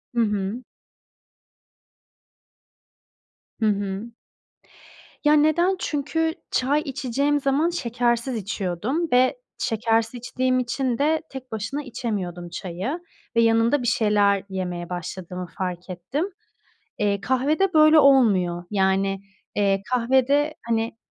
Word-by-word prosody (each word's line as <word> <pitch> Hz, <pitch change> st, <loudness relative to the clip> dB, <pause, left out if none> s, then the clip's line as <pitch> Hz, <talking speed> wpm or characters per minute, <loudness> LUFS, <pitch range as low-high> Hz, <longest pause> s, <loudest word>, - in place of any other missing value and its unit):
Hı -, -, +1 dB
hı. 210 Hz, +2 st, -1 dB, 3.0 s
Hı -, -, +3 dB
hı. 200 Hz, +1 st, -1 dB, 1.2 s
Ya 295 Hz, -, +6 dB
neden? 310 Hz, +5 st, +3 dB
Çünkü 320 Hz, +1 st, -1 dB, 0.2 s
çay 280 Hz, +4 st, +2 dB
içeceğim 280 Hz, 0 st, 0 dB
zaman 280 Hz, +4 st, +2 dB
şekersiz 240 Hz, -4 st, -1 dB
içiyordum 210 Hz, -, -2 dB
ve 255 Hz, -, +4 dB, 0.2 s
şekersiz 225 Hz, 0 st, 0 dB
içtiğim 255 Hz, +1 st, 0 dB
için 250 Hz, 0 st, -1 dB
de 310 Hz, +3 st, +2 dB
tek 260 Hz, -1 st, -9 dB
başına 225 Hz, +7 st, -3 dB
içemiyordum 190 Hz, -9 st, -4 dB
çayı 185 Hz, -, -4 dB, 0.4 s
ve 230 Hz, -, +5 dB
yanında 230 Hz, +4 st, +3 dB
bir -, -, -1 dB
şeyler 205 Hz, -3 st, +3 dB
yemeye 180 Hz, -2 st, -4 dB
başladığımı 180 Hz, 0 st, -5 dB
fark 180 Hz, -1 st, -4 dB
ettim. 185 Hz, -, -3 dB, 0.7 s
Eee, 200 Hz, -1 st, +1 dB
kahvede, 290 Hz, -, +1 dB
böyle, 310 Hz, 0 st, +7 dB
olmuyor. 200 Hz, -, +4 dB
Yani, 195 Hz, -1 st, +1 dB, 0.4 s
eee, 195 Hz, -1 st, +2 dB
kahvede, 265 Hz, +5 st, +2 dB
hani 225 Hz, 0 st, -1 dB
235 Hz, 105 wpm, -24 LUFS, 195-275 Hz, 3.0 s, böyle